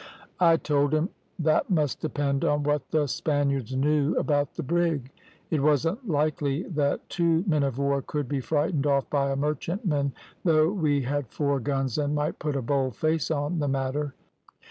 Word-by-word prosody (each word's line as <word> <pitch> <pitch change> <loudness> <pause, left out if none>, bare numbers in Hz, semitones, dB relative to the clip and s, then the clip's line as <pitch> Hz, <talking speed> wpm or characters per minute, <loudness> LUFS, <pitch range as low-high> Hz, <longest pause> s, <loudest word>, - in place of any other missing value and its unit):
"I 165 -2 +5
told 145 -1 +1
him 155 +5 +1 0.3
that 155 -3 +2
must 155 -7 +1
depend 145 -3 -1
on 145 0 +1
what 150 0 0
the 155 -2 +2
Spaniards 140 -3 -1
knew 150 +2 +2
about 145 -1 0
the 170 - -4
brig. 160 -4 0 0.4
It 155 -4 +1
wasn't 165 - +1
likely 150 0 0
that 145 -4 -1
two 170 -1 +1
men 155 -6 +2
of 135 -3 -1
war 140 0 +1
could 145 +1 -3
be 140 +1 -1
frightened 150 +1 0
off 140 -2 +2
by 140 -1 +1
a 135 - 0
merchantman, 150 - -1 0.3
though 160 -1 +4
we 150 -8 +1
had 145 +1 -2
four 140 +4 0
guns 135 +1 -1
and 145 0 0
might 150 0 -1
put 150 -2 -2
a 135 - -1
bold 130 -2 0
face 160 +2 0
on 155 +2 -1
the 145 - 0
matter. 135 +1 -1
145 Hz, 175 wpm, -26 LUFS, 140-155 Hz, 0.4 s, I